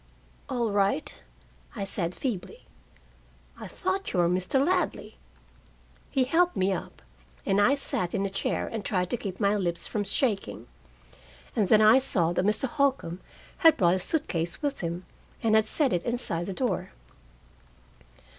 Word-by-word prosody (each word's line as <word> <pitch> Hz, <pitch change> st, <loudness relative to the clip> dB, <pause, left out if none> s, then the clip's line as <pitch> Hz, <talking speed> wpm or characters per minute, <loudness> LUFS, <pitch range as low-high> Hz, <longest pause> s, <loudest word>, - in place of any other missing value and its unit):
"All 240 Hz, -4 st, 0 dB
right," 200 Hz, -5 st, +1 dB, 0.6 s
I -, -, -3 dB
said 180 Hz, -3 st, -2 dB
feebly. 230 Hz, -10 st, -5 dB, 0.9 s
"I -, -, -7 dB
thought 380 Hz, +1 st, -2 dB
you 180 Hz, -, +1 dB
were 175 Hz, -, +4 dB
Mr. 185 Hz, +9 st, +1 dB
Ladley." 360 Hz, -, -1 dB, 0.9 s
He 265 Hz, -, +2 dB
helped 345 Hz, +7 st, +2 dB
me 190 Hz, +1 st, +2 dB
up, 180 Hz, -, -7 dB, 0.4 s
and 195 Hz, +1 st, +3 dB
I 250 Hz, +7 st, +5 dB
sat 185 Hz, -10 st, -2 dB
in 200 Hz, 0 st, 0 dB
a -, -, -1 dB
chair 195 Hz, -, -1 dB
and 225 Hz, -2 st, -5 dB
tried 180 Hz, -2 st, -1 dB
to 245 Hz, -, +1 dB
keep 195 Hz, -4 st, -6 dB
my 200 Hz, -1 st, +2 dB
lips 175 Hz, -4 st, -1 dB
from 210 Hz, -, -2 dB
shaking. 205 Hz, -1 st, -1 dB, 0.9 s
And 210 Hz, -5 st, +2 dB
then 215 Hz, +3 st, +6 dB
I 215 Hz, +5 st, +7 dB
saw 175 Hz, -11 st, +1 dB
that 180 Hz, -, 0 dB
Mr. 215 Hz, +5 st, +2 dB
Holcombe 260 Hz, -, 0 dB, 0.4 s
had 325 Hz, -2 st, +6 dB
brought 175 Hz, -1 st, +4 dB
a 185 Hz, -, 0 dB
suit 310 Hz, -, -1 dB
case 170 Hz, +1 st, -2 dB
with 285 Hz, -1 st, -1 dB
him, 170 Hz, +1 st, -4 dB, 0.4 s
and 225 Hz, -1 st, +2 dB
had 220 Hz, -1 st, +5 dB
set 285 Hz, 0 st, +1 dB
it 175 Hz, -, 0 dB
inside 235 Hz, -8 st, -2 dB
the 195 Hz, -, -3 dB
door. 245 Hz, -, -2 dB
205 Hz, 165 wpm, -27 LUFS, 180-260 Hz, 0.9 s, I